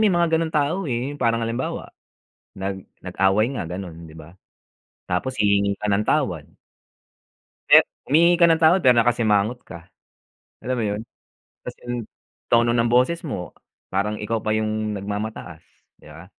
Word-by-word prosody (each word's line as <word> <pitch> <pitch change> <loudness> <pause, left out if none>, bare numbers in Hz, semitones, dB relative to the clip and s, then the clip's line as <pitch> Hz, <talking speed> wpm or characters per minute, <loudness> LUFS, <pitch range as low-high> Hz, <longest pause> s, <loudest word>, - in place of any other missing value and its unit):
may 215 - +4
mga 170 -1 +1
ganong 160 -1 -2
tao, 155 +4 0
eh. 125 +3 -2
Parang 115 -1 +1
halimbawa, 115 +3 -4 0.7
nag 95 -1 -4 0.2
nag-away 95 +4 +1
nga 105 - -3
gano'n, 90 -2 -7
'di 80 - -14
ba, 85 +4 -14 0.8
tapos 130 +9 -1
hihingi 100 -1 +2
ka 105 - -2
ng 100 +2 +1
tawad - - 0 1.2
Eh, - - +9 0.3
humihingi 170 +4 +5
ka 170 - +7
ng 165 0 +2
tawad, 170 +4 +5
pero 125 -2 +5
nakasimangot 115 0 +2
ka, 85 0 -12 0.8
alam 130 +1 -3
mo 115 - -1
yun? 105 0 -2 0.6
Ta's - - -7
yung 120 -2 -3 0.5
tono 120 0 +4
ng 115 0 +2
boses 130 +8 +2
mo, 90 - -6 0.3
parang 105 +2 -1
ikaw 110 +1 -2
pa 110 - -1
yung 110 0 -1
nagmamataas, 105 +2 -6 0.4
'di - - -16
ba? 80 +4 -12
110 Hz, 155 wpm, -22 LUFS, 100-130 Hz, 1.2 s, Eh